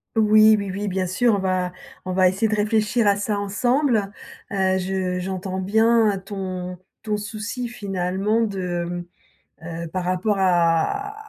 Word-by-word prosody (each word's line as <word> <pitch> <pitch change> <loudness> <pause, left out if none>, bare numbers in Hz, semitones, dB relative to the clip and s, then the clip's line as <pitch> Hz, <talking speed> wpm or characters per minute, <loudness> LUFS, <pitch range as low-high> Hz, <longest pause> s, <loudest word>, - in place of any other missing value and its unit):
Oui, 215 0 +6
oui, 200 -2 -3
oui, 205 +2 -3
bien 185 -1 -1
sûr, 210 +5 +2
on - - 0
va 185 -1 -1 0.3
on 185 - -3
va 185 0 +4
essayer 195 +5 +1
de 215 - 0
réfléchir 215 +2 +1
à 200 0 +4
ça 205 0 -1
ensemble. 230 +1 +1 0.4
Heu, 190 -2 +1
je 185 -1 -2
j'entends 190 0 -4
bien 220 +1 +3
ton 185 -2 -5 0.3
ton 210 -1 -1
souci, 215 +4 -5
finalement, 195 -1 -1
de, 185 -5 -2
mmh, 175 0 -5 0.8
heu, - - -5
par 180 +1 -3
rapport 185 +3 0
à 185 - +1
195 Hz, 155 wpm, -22 LUFS, 185-215 Hz, 0.8 s, Oui